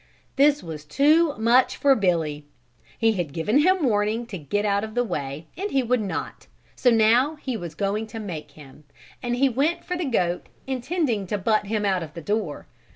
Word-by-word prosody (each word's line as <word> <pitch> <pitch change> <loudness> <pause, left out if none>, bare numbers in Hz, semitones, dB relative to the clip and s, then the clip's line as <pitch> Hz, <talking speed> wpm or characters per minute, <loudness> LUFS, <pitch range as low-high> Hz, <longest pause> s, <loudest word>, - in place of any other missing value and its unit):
This 290 +1 +4
was 155 -3 -7
too 295 - +3
much 235 +3 +3
for 280 -1 +5
Billy. 165 - 0 0.5
He 225 -1 +3
had 175 -9 -3
given 210 - +2
him 370 +2 +3
warning 215 0 +1
to - - -2
get 205 +8 -2
out 200 0 +1
of 220 0 -6
the 245 - +2
way 150 - -4
and 400 +3 -3
he 270 -6 +1
would 245 0 +1
not, 200 - -5 0.3
so 250 - +3
now 235 +6 +4
he 265 -4 -4
was 175 -6 -6
going 205 +2 -1
to 225 - -9
make 160 -8 -6
him, 145 0 -15 0.4
and 240 -1 -1
he 270 +3 +3
went 275 +7 0
for 360 - -2
the 350 -1 -2
goat 180 -9 0 0.2
intending 260 - -1
to 210 - -1
butt 215 +1 +1
him 210 0 -1
out 190 -2 +1
of 160 -1 -8
the 170 - -6
door. 205 -6 -2
220 Hz, 200 wpm, -24 LUFS, 180-260 Hz, 0.5 s, for